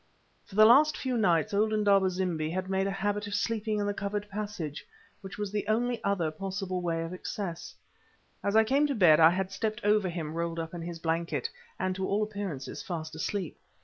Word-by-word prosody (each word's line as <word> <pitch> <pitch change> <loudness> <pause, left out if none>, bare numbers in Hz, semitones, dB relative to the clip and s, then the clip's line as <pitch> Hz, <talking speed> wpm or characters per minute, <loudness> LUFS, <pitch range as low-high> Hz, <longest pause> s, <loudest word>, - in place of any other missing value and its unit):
For 195 - -13
the 215 +1 +8
last 295 +7 +6
few 260 -2 -2
nights 195 -2 +2
old 215 +2 +2
Indaba 200 -3 +3
zimbi 175 -4 -1
had 185 +3 -3
made 190 0 +1
a - - -1
habit 205 0 0
of 205 - -3
sleeping 215 0 -1
in 205 - 0
the 205 - 0
covered 205 +1 -3
passage, 195 -8 -5 0.4
which 195 - -9
was 205 -2 -3
the 210 -1 -2
only 240 +2 0
other 185 -6 0
possible 190 +1 -4
way 165 -1 -1
of 165 +2 -6
access. 185 -1 -5 0.7
As 200 +1 0
I 220 - +7
came 275 +6 +2
to 280 - -1
bed 170 -7 +6
I 160 0 +8
had 185 +2 -1
stepped 215 +2 -3
over 210 -2 +3
him 165 -3 -4
rolled 170 0 -2
up 165 0 -4
in 175 - -5
his 170 0 -5
blanket, 165 -4 -2 0.3
and 185 0 -1
to 190 0 -2
all 205 +2 +1
appearances 200 -10 -5
fast 160 -3 -5
asleep. 175 +2 -3
195 Hz, 210 wpm, -29 LUFS, 170-210 Hz, 0.7 s, the